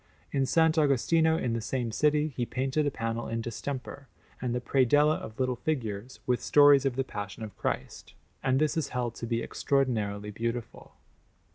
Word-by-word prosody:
In 140 - 0
S. 135 - -1
Agostino 160 0 +3
in 120 -6 -1
the 115 - -1
same 120 0 -2
city 150 +5 +2
he 120 - -1
painted 135 +5 -1
a - - +3
panel 115 -3 -3
in 115 - -2
distemper, 130 +4 -5 0.3
and 125 -1 -1
the - - 0
predella 145 +4 +3
of 110 - -9
little 130 -1 0
figures, 120 -4 -3
with 125 -1 +1
stories 145 -2 +6
of 130 - -2
the 135 - 0
Passion 105 -4 -6
of 105 -3 -8
Christ; - - -4 0.3
and 130 0 +2
this 155 +2 +1
is 160 -4 0
held 120 -2 -2
to 115 - -6
be 115 0 -1
extraordinarily 105 -7 -1
beautiful. 115 +2 -5
130 Hz, 175 wpm, -29 LUFS, 115-145 Hz, 0.3 s, stories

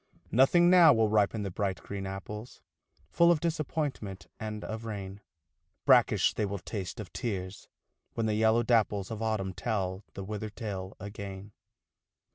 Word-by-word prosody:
Nothing 135 +9 +5
now 180 -2 +8
will 110 -2 +3
ripen 105 0 +2
the 100 - -3
bright 95 0 -2
green 100 -1 -5
apples, 105 +4 -7 0.5
Full 170 0 +5
of 170 - +3
disappointment 145 - -3
and 110 -1 -5
of 110 +1 -5
rain, 100 -3 -6 0.6
Brackish - - +5
they - - -1
will 100 0 -2
taste, 100 +2 -6
of 90 -7 -8
tears, 100 -5 -4 0.5
when 115 - 0
the 110 - +1
yellow 110 +2 +3
dapples 105 -4 +1
Of 110 -1 -5
Autumn 105 -4 -1
tell 95 -1 -2
the 100 - -5
withered 105 +1 -5
tale 95 -4 -5
again. 100 0 -7
105 Hz, 150 wpm, -30 LUFS, 95-115 Hz, 0.6 s, now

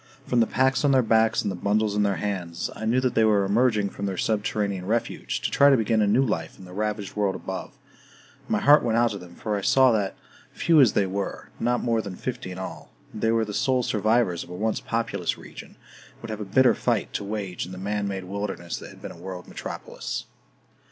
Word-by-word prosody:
From 125 - +1
the 115 - +4
packs 130 +2 +2
on 140 -1 +4
their 130 -1 +5
backs 110 0 +3
and - - -1
the - - -4
bundles 105 +3 +1
in 105 - +2
their 100 -1 +2
hands, 90 -5 -3
I 110 - -5
knew 120 +3 +3
that 130 -1 0
they 110 - +3
were 105 -2 +4
emerging 105 -1 +2
from 100 - -4
their 95 -2 -3
subterranean 100 -2 -1
refuge, 115 +2 -2
to - - -1
try 140 - +6
to 135 - +5
begin 110 -1 +2
a 105 - +3
new 130 +7 +4
life 80 -8 -3
in 95 - -12
the 90 - -12
ravaged 105 0 -3
world 100 -2 +1
above; - - -6 0.6
and - - -26
my - - +1
heart 145 +1 +7
went 115 -1 +1
out 120 -1 +3
to 100 - -5
them, 90 -1 -13
for 105 -1 -2
I 100 - -2
saw 130 +5 +5
that, 105 -4 0 0.4
few 165 -3 +4
as 125 -6 +5
they 100 - +2
were 100 +1 -4
not 120 +1 0
more 115 -2 +1
than 100 -3 -7
fifty 125 -3 -5
in 90 - -7
all 95 - -7 0.2
they 110 +1 0
were 115 -1 +2
the 105 - -6
sole 130 +2 +1
survivors 110 -4 +1
of - - -15
a 90 - -7
once 110 +4 -1
populous 115 0 -2
region, - - -11
and - - -22
would 115 - -5
have 110 0 -5
a - - -3
bitter 125 +6 +4
fight 115 -4 -1
to - - -2
wage 100 -4 -4
in - - -10
the 95 - -7
man 100 +2 -2
made 95 -1 -4
wilderness 95 -2 -4
that - - -9
had - - -15
been - - -6
a - - -11
world 90 +1 -8
metropolis. - - -6
105 Hz, 240 wpm, -25 LUFS, 100-115 Hz, 0.6 s, heart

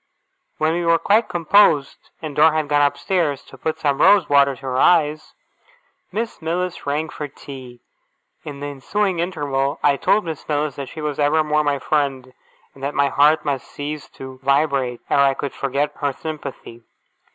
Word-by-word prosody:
When 155 +1 +1
we 175 +1 -1
were 170 0 +4
quite 215 +6 +2
composed, 170 -4 +2
and 150 -3 -5
Dora 155 +1 +5
had 155 -1 -1
gone 145 0 +3
up 145 0 +2
stairs 165 -8 -1
to - - -15
put 155 +4 -3
some 140 -2 0
rose 200 -6 +5
water 140 -1 +4
to 125 - -18
her 130 -1 -2
eyes, 155 -1 +2 0.8
Miss 225 -2 -4
Mills 175 0 -3
rang 150 +3 -1
for 150 -1 -6
tea. 130 -3 -11 0.6
In 145 -2 -8
the - - -4
ensuing 175 +7 -2
interval, 145 -5 -1
I 140 -1 +4
told 210 +8 +2
Miss 160 -2 -7
Mills 150 -1 -1
that 140 -2 -6
she 155 - -8
was 150 -1 -3
evermore 150 +1 +2
my 145 -1 0
friend, 135 -3 -1 0.4
and 135 - -17
that 140 +2 -3
my 140 0 +2
heart 150 +3 +3
must 140 -4 -2
cease 145 0 -6
to 130 -1 -9
vibrate 140 -3 +1
ere - - +2
I 135 -1 +4
could 140 0 -4
forget 140 +2 -1
her 145 -2 -1
sympathy. 140 -6 -8
145 Hz, 180 wpm, -21 LUFS, 140-160 Hz, 0.8 s, Dora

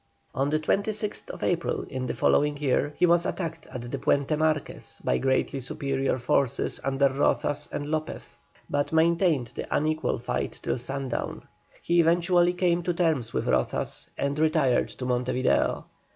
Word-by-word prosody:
On 135 +2 0
the 155 - +2
26th 205 +6 -1
April 170 -1 0
in 130 -1 -5
the - - -3
following 145 0 +2
year 145 0 +1
he - - +4
was 170 0 +3
attacked 165 -3 -4
at 120 -2 -7
the 140 - -3
Puente 140 +3 +1
Marquez 155 -1 -2
by - - +1
greatly 135 +1 0
superior 135 -1 -1
forces 130 0 0
under 135 +1 +2
Rozas 140 +1 0
and 145 - -3
Lopez, 155 +1 -4 0.3
but 145 0 -1
maintained 160 - +2
the - - -5
unequal 155 +1 0
fight - - -3
till - - -1
sundown. 135 +2 -4 0.4
He 175 0 +2
eventually 175 +1 +3
came 175 -1 +1
to 175 0 -1
terms 160 -10 +1
with - - -2
Rozas, 65 0 0
and 140 +1 -1
retired 155 -5 +2
to 125 - -7
Monte 125 0 0
Video. 120 - +1
145 Hz, 155 wpm, -26 LUFS, 135-165 Hz, 0.4 s, he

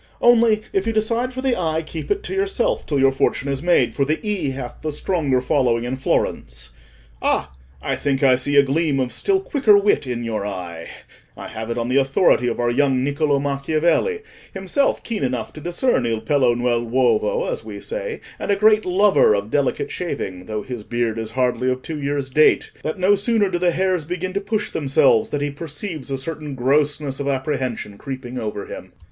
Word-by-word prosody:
Only, 230 -3 +4
if 195 +2 0
you 225 - +1
decide 230 +3 0
for 260 +1 -6
the 260 -2 +2
i, 160 -2 -1
keep 160 0 -7
it 410 0 0
to 410 - -5
yourself 405 +6 0
till 145 - 0
your 135 0 +4
fortune 135 0 0
is 140 -1 -1
made, 145 -9 +3
for 140 - +1
the 155 +3 0
e 200 -9 -1
hath 130 -2 -6
the 155 - -2
stronger 145 -5 0
following 125 -3 +1
in 125 +2 -2
Florence. - - -2 0.5
Ah! - - 0 0.3
I - - -1
think 140 -1 -1
I 130 -2 +6
see 145 +3 -1
a 140 - +7
gleam 140 0 +1
of 125 -2 -1
still 390 -1 +1
quicker 275 - +4
wit 200 -8 +2
in 120 -1 -3
your 110 -3 -2
eye. 90 -5 -6 0.5
I - - -7
have 110 +1 -6
it 115 - -2
on 115 0 -1
the 130 +2 +1
authority 135 -1 +3
of 120 - -2
our 120 0 +1
young 130 0 +2
Niccolò 145 0 +1
Macchiavelli, 155 - 0 0.3
himself 195 +9 0
keen 225 -8 -3
enough 125 -4 -2
to 155 - -10
discern 175 - 0
il 115 -1 -1
pelo 125 0 +2
nell' 120 -1 +1
uovo, 130 - +1
as - - -3
we - - -8
say, - - -5 0.2
and - - -5
a 200 - +4
great 215 +1 +4
lover 190 - +4
of 100 +2 -3
delicate 140 -3 0
shaving, 95 - -5
though 105 -1 -3
his 125 -1 -6
beard 115 0 -2
is 110 -1 -4
hardly 125 0 0
of 130 0 -2
two 155 -2 -5
years' 140 -1 -2
date, 155 +3 +4
that 155 - -3
no 185 +2 +4
sooner 205 -1 +1
do 175 - -1
the 180 0 +3
hairs 180 0 0
begin 180 +3 -4
to 200 - -1
push 210 0 -2
themselves, 135 -5 +3
than 145 - -2
he 145 0 -1
perceives 155 0 -6
a 135 - -1
certain 150 0 -5
grossness 140 +2 0
of 140 - -3
apprehension 130 -6 -2
creeping 130 -2 -6
over 105 -3 -4
him." - - -9
145 Hz, 205 wpm, -21 LUFS, 125-190 Hz, 0.5 s, a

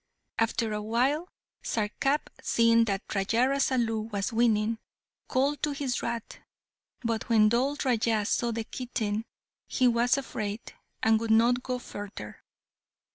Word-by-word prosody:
After 225 -1 +1
a 210 - -2
while, 260 - 0 0.3
Sarkap, 270 +7 -1
seeing 230 0 +4
Raja 200 +3 0
Rasalu 240 -5 0
was 200 +3 -2
winning, 225 -1 +2 0.5
called 275 +2 +1
to 295 - 0
his 275 -4 -2
rat, 235 -2 -4 0.6
but 230 -1 -2
when 215 -2 +5
Dhol 265 +5 +1
Raja 225 -4 +2
saw 235 +2 +1
the 230 -1 -2
kitten 220 -3 -3 0.4
he 255 - +2
was 240 +2 +3
afraid, 215 -5 -4 0.3
and 220 0 +4
would 225 0 -3
not 235 +3 +4
go 250 0 -2
further. 205 -4 -8
230 Hz, 130 wpm, -28 LUFS, 220-250 Hz, 0.6 s, when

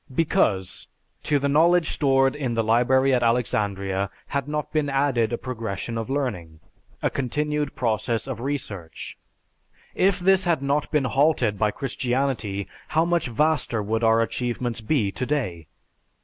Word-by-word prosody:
Because, 110 - 0 0.3
to 150 - +1
the 140 0 0
knowledge 165 +4 +3
stored 135 -2 +2
in 130 -5 -2
the 115 - +1
library 130 +4 +3
at 125 - +2
Alexandria 100 -5 0 0.2
had 140 0 -2
not 150 0 -3
been 150 -2 +1
added 135 -5 +1
a 120 - -1
progression 115 -3 -5
of 115 +1 -4
learning, 105 - -3 0.4
a - - +1
continued 150 +2 -2
process 115 -1 -1
of 130 -4 -4
research; 115 - -5 0.8
if 190 0 +2
this 190 +1 +4
had 165 -5 +1
not 140 +2 0
been 150 -3 +1
halted 130 -7 +2
by 105 - +3
Christianity, 120 -4 -2 0.2
how 160 +2 +2
much 170 -3 +1
vaster 125 -3 +1
would 110 +3 -1
our 115 0 +4
achievements 120 0 -3
be 110 -4 +1
today? 125 - -3
125 Hz, 145 wpm, -24 LUFS, 110-145 Hz, 0.8 s, this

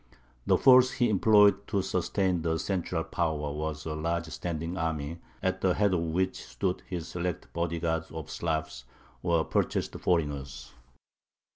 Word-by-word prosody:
The - - +5
force 130 -1 +6
he 120 -4 +2
employed 105 -1 +5
to 100 -3 0
sustain 90 -1 0
the 80 0 0
central 90 -2 -2
power 80 -2 -1
was 75 0 -4
a 80 - -3
large 85 +2 -1
standing 85 +1 -4
army, 80 -2 -3 0.2
at - - 0
the - - +2
head 100 -1 +2
of 90 - +2
which 90 +3 -1
stood 95 -2 -2
his 85 -3 -4
select 90 0 -4
body 85 0 -1
guard 80 -1 -1
of 80 -1 -7
Slavs, 80 -6 -3 0.4
or 85 -2 +2
purchased - - 0
foreigners. 70 -6 -1
85 Hz, 150 wpm, -29 LUFS, 80-95 Hz, 0.4 s, force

